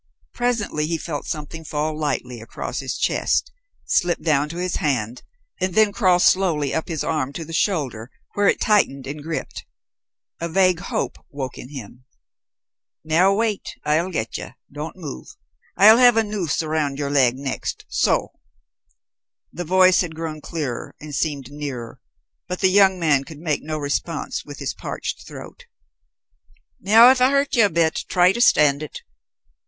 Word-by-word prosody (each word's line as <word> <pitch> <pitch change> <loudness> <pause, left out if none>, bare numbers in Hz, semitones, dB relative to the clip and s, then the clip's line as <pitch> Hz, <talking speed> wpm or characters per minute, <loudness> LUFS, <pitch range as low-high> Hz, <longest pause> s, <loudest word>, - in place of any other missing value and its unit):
Presently 225 -11 -1
he 165 0 -1
felt 150 -2 -5
something 155 +1 -5
fall 155 0 -2
lightly 125 -6 -3
across 115 - -5
his - - -4
chest, - - 0 0.3
slip 175 -1 +1
down 150 -2 +1
to 165 - -7
his 180 0 -2
hand, 125 -5 -1 0.4
and 185 -1 -1
then 215 -1 +5
crawl 185 -5 +3
slowly 175 -6 +2
up 160 - -2
his 160 -4 -3
arm 150 -4 -1
to 165 +2 -6
the 165 - -9
shoulder, 135 - -1 0.2
where 205 0 +2
it - - +3
tightened 140 -11 +2
and 145 +2 -6
gripped. 160 +1 -5 0.8
A 170 - -3
vague 185 0 +3
hope - - -3
awoke 135 -3 -6
in 125 - -9
him. 125 -2 -10 1.0
"Now, 165 +5 +3
wait. 215 -2 -2
I'll 155 +4 +1
get 115 -11 -3
ye; 120 - -9 0.2
don't 150 +2 -6
move. 150 - -8 0.5
I'll 220 +4 +8
have 245 -2 +6
a 225 - +4
noose 200 -7 -2
around 155 -3 -1
ye'r 140 -1 -2
leg 130 -3 +3
next, 135 -1 -4
so." - - +1 1.2
The 175 - -5
voice 185 +1 +5
had 165 -3 -4
grown 160 -1 -5
clearer, 145 -8 -5
and 150 0 -9
seemed 140 -3 -2
nearer, 140 -6 -6 0.5
but 180 - -4
the 190 -1 +4
young 190 -1 +5
man 150 -5 +2
could 155 +1 -11
make 155 -2 -2
no 155 0 -4
response 145 -1 -3
with - - -10
his - - -3
parched - - -6
throat. - - -11 1.1
"Now 225 +6 +7
if 260 -1 +1
I 255 - +6
hurt 280 0 +1
ye 235 - +5
a 205 - +5
bit, 165 -2 0
try 180 0 +4
to 235 +4 -2
stand 150 - +4
it." 155 - -7
160 Hz, 165 wpm, -22 LUFS, 145-185 Hz, 1.2 s, I'll